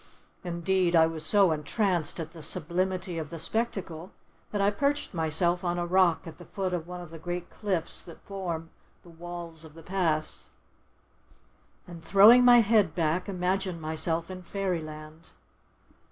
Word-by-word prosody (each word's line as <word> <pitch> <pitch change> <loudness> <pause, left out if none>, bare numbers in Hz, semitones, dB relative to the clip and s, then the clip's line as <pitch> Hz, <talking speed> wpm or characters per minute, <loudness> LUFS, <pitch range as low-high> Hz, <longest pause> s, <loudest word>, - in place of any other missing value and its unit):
Indeed, 175 0 +1
I 160 -1 +7
was 160 -1 -3
so 195 +2 +4
entranced 170 +2 0
at 160 -1 -5
the 165 -2 -11
sublimity 180 +2 -1
of 155 -2 -5
the 165 - -6
spectacle, 185 -2 -3 0.4
that 205 - -3
I 200 +1 +3
perched 285 +6 -1
myself 170 +2 +1
on 175 -1 -1
a 175 - -1
rock 180 -2 +3
at 165 0 -10
the 175 - -11
foot 190 -2 -3
of 170 -2 -3
one 180 0 -7
of 175 -2 -10
the 165 - -9
great 175 +1 -5
cliffs 185 -6 -3
that 170 - -12
form 170 -5 -5 0.3
the 175 - -15
walls 170 -1 -7
of 160 -1 -13
the 165 - -12
Pass, 165 -5 -1 1.4
and, 170 -2 -10
throwing 210 +8 +8
my 245 -1 +8
head 210 -7 +3
back, 170 +3 0
imagined 185 -1 -1
myself 160 +2 -2
in 185 0 -7
fairyland. 160 -4 -5
175 Hz, 160 wpm, -28 LUFS, 160-190 Hz, 1.4 s, throwing